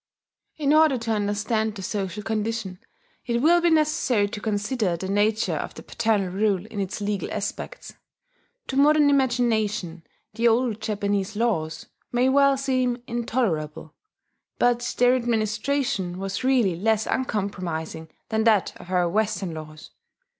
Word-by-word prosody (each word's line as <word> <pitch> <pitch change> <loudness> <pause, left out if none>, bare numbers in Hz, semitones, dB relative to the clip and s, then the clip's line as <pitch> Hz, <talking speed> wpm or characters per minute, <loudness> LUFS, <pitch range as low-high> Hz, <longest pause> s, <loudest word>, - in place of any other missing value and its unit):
In 295 -1 +2
order 310 -3 +5
to 230 -1 -3
understand 210 +1 0
the 195 - -7
social 205 +1 -3
condition, 215 -3 -3 0.5
it 235 -1 +1
will 340 +6 +4
be 345 - +3
necessary 305 -9 +2
to 205 - -6
consider 205 -3 -1
the 190 - -5
nature 210 +3 +1
of - - -5
the - - -10
paternal 215 -5 0
rule 200 -1 0
in 220 -1 -7
its 195 +1 -3
legal 205 -1 -2
aspects. - - -5 0.8
To 265 - -3
modern 295 +1 +5
imagination 220 -9 +1 0.3
the 230 +2 +2
old 230 -1 +1
Japanese 205 -1 -1
laws 205 -9 -1 0.3
may 245 +2 +2
well 275 0 +4
seem 255 -2 0
intolerable; 225 - -2 0.6
but 245 0 +2 0.2
their 245 +1 +5
administration 230 -4 -1
was 195 +3 -4
really 245 -9 +3
less 220 +4 +1
uncompromising 180 -9 -3 0.2
than 220 0 +1
that 215 -4 +3
of 175 - -13
our 180 -1 +2
Western 205 -1 -1
laws. 155 -1 -10
220 Hz, 140 wpm, -24 LUFS, 195-245 Hz, 0.8 s, order